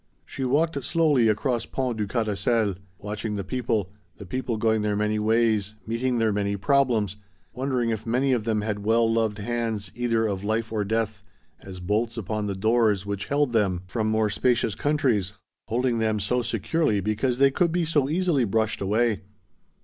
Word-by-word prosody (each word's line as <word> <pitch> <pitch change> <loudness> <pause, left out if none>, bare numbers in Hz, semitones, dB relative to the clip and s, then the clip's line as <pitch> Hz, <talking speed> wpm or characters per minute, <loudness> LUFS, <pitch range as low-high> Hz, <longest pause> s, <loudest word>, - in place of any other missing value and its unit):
She 135 - -6
walked 140 +2 +1
slowly 150 -5 +3
across 115 +3 0
Pont 130 -3 -2
du 105 -1 -1
Carrousel, 110 -1 0 0.2
watching 105 +1 -4
the 100 - -3
people, 110 -3 -1 0.3
the 100 - -9
people 120 +4 -3
going 110 0 +2
their 105 -1 0
many 105 +1 0
ways, 110 -2 +1
meeting 120 +2 -1
their 110 -2 +2
many 100 0 -1
problems, 115 -5 +1 0.4
wondering 125 -3 -1
if 110 0 -4
many 130 +4 +2
of 120 -4 +1
them 110 -1 0
had 105 -1 -3
well 115 +2 +3
loved 110 -2 0
hands, 110 -3 -3
either 115 -2 0
of 100 -2 -2
life 110 +2 -1
or 105 -2 0
death, 110 0 -1 0.4
as 95 -1 -9
bolts 110 +6 -1
upon 105 0 -2
the 100 - -2
doors 110 -1 +2
which 100 -1 -4
held 140 -3 +1
them 95 -5 +1
from 110 +3 -2
more 110 -1 +1
spacious 120 -1 +1
countries, 125 - 0 0.3
holding 120 0 0
them 110 -1 +1
so 125 +5 0
securely 115 - 0
because 110 +5 0
they 135 +1 +5
could 170 +4 +1
be 175 0 +1
so 145 -4 +1
easily 165 -4 +2
brushed 110 0 0
away. 105 +1 +1
110 Hz, 175 wpm, -25 LUFS, 105-125 Hz, 0.4 s, they